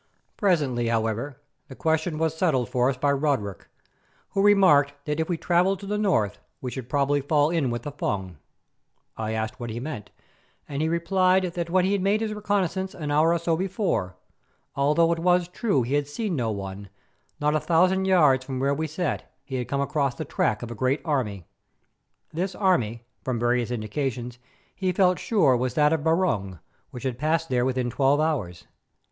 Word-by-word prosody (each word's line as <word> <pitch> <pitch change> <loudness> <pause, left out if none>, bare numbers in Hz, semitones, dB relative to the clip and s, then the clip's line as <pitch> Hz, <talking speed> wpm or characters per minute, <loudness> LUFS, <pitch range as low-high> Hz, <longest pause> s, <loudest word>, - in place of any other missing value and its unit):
Presently, 145 - +1
however, 115 +4 -1 0.3
the 130 - -10
question 160 +1 0
was 160 0 0
settled 150 -8 +1
for 125 0 +2
us 135 - -2
by 140 +2 +2
Roderick, 135 - -1 0.6
who 195 - 0
remarked 185 -9 +5
that 150 +1 -2
if 160 - -1
we 175 - 0
travelled 180 +3 +2
to - - -7
the 210 +1 -2
north 135 - +1 0.2
we 125 - -5
should 125 -2 -7
probably 145 0 +1
fall 145 +2 +2
in 160 -7 +1
with 120 0 -3
the 145 - -5
Fung. 95 - -3 0.8
I 110 0 -3
asked 110 0 -3
what 120 -1 -5
he 115 +1 -4
meant, 130 -5 -6 0.6
and 140 0 -3
he 160 - +1
replied 185 +2 +2
that 170 -2 -3
when 185 +1 +3
he 200 +1 +1
made 200 +3 +1
his 220 -1 -2
reconnaissance 195 -3 -1
an 150 -3 -4
hour 155 +3 +4
or 170 - +3
so 165 0 0
before, 185 - -1 0.6
although 150 +4 +3
it 170 - 0
was 180 0 +3
true 180 - 0
that - - -5
he - - -1
had 145 -1 +1
seen 190 +5 -3
no 120 -5 -1
one, 100 -1 -6 0.5
not 150 0 +1
a 155 - +2
thousand 185 +4 +2
yards 150 -9 +4
from 130 -1 -5
where 140 +1 +1
we 160 +2 -2
sat 155 - -3
he 130 -1 -5
had 125 - -3
come 140 0 -1
across 140 -2 0
the - - -5
track 110 0 0
of 120 - -6
a - - -3
great 130 +6 0
army. 110 - -1 0.9
This 180 +3 -2
army, 120 - +1 0.2
from 130 -2 -1
various 120 0 +1
indications, 120 +1 -3 0.4
he 185 -2 -1
felt 180 -2 +3
sure 160 - +3
was 125 0 -1
that 150 0 +4
of 160 -2 -1
Barung, 160 - +1 0.3
which 125 - -9
had 125 -2 -3
passed 160 +2 0
there 125 -1 +1
within 130 -2 -1
twelve 135 +3 +2
hours. 130 - -1
145 Hz, 190 wpm, -25 LUFS, 125-175 Hz, 0.9 s, remarked